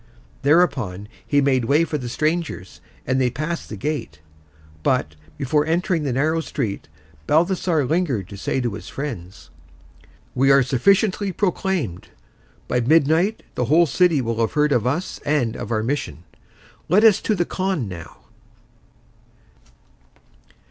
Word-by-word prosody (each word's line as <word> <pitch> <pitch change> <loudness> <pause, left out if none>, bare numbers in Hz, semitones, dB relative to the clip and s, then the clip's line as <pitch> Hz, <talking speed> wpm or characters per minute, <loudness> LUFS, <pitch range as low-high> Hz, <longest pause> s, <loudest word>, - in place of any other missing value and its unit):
Thereupon 135 - +2 0.2
he 145 -1 +3
made 130 -3 +2
way 145 +7 +3
for 155 -2 -2
the 125 -2 -5
strangers, 155 - -2 0.2
and 130 +1 +1
they 125 - +2
passed 155 +7 -4
the - - -5
gate. 135 - -4 0.6
But, 75 0 0 0.2
before 145 +2 +1
entering 170 +2 0
the 135 - 0
narrow 155 +6 +1
street, 115 - -4 0.4
Balthasar 170 -2 +2
lingered 135 - 0
to 100 - -8
say 100 +6 -2
to 120 -4 -2
his - - -8
friends, 105 -11 -7 0.8
"We 135 +2 +2
are 135 -1 +6
sufficiently 195 - +2
proclaimed. 180 - -2 0.6
By 125 - +1
midnight 160 - +2
the 125 - -1
whole 160 +7 +4
city 165 -1 +2
will 115 -1 -3
have 115 - 0
heard 150 -1 +2
of 125 -3 +2
us 160 +8 -2
and 140 -6 0
of 105 - -6
our 110 -1 0
mission. 125 - -3 0.7
Let 195 +6 +4
us 220 -4 +6
to 215 - 0
the 175 -2 0
khan 185 - -2
now." 85 -8 -10
145 Hz, 140 wpm, -22 LUFS, 120-170 Hz, 0.8 s, are